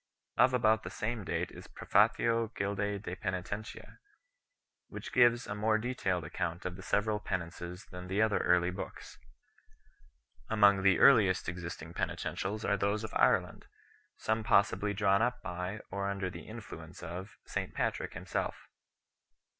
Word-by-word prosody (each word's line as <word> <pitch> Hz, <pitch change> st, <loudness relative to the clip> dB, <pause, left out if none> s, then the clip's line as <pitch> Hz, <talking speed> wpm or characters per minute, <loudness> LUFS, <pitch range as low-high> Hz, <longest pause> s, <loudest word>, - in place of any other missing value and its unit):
Of 130 Hz, 0 st, +5 dB
about 110 Hz, -2 st, +3 dB
the -, -, -6 dB
same 115 Hz, 0 st, -3 dB
date -, -, -2 dB
is -, -, -11 dB
the -, -, -16 dB
Prefatio 115 Hz, -1 st, +2 dB
Gildce 100 Hz, 0 st, -2 dB
de 90 Hz, -, -4 dB
Peni 95 Hz, -1 st, -3 dB
tentia 105 Hz, +5 st, -6 dB
5, -, -, -18 dB, 0.9 s
which -, -, -8 dB
gives 120 Hz, -1 st, +5 dB
a -, -, -4 dB
more 110 Hz, +1 st, +2 dB
detailed 110 Hz, -7 st, -1 dB
account 85 Hz, +2 st, -3 dB
of 90 Hz, -1 st, -3 dB
the 95 Hz, -, -10 dB
several 105 Hz, +2 st, 0 dB
penances 90 Hz, -1 st, -5 dB
than 90 Hz, 0 st, -8 dB
the 95 Hz, +3 st, -1 dB
other 110 Hz, -1 st, +3 dB
early 90 Hz, 0 st, +3 dB
books. 95 Hz, -, -8 dB, 1.3 s
Among 100 Hz, -3 st, +5 dB
the 95 Hz, -1 st, +5 dB
earliest 105 Hz, -9 st, +5 dB
existing 85 Hz, -1 st, -6 dB
penitentials 105 Hz, +4 st, -3 dB
are 100 Hz, -, +2 dB
those 100 Hz, +3 st, 0 dB
of 110 Hz, -, -6 dB
Ireland -, -, +2 dB, 0.5 s
6, -, -, -17 dB
some 110 Hz, 0 st, +1 dB
possibly 100 Hz, 0 st, +3 dB
drawn 100 Hz, 0 st, +3 dB
up 125 Hz, +1 st, +1 dB
by, 90 Hz, +4 st, -4 dB
or 100 Hz, +1 st, -2 dB
under 100 Hz, -2 st, -2 dB
the 85 Hz, -1 st, -9 dB
influence 90 Hz, -7 st, -9 dB
of, 90 Hz, +3 st, -7 dB
St -, -, -3 dB
Patrick -, -, -1 dB
him -, -, -7 dB
self. -, -, -3 dB
100 Hz, 160 wpm, -32 LUFS, 90-110 Hz, 1.3 s, Of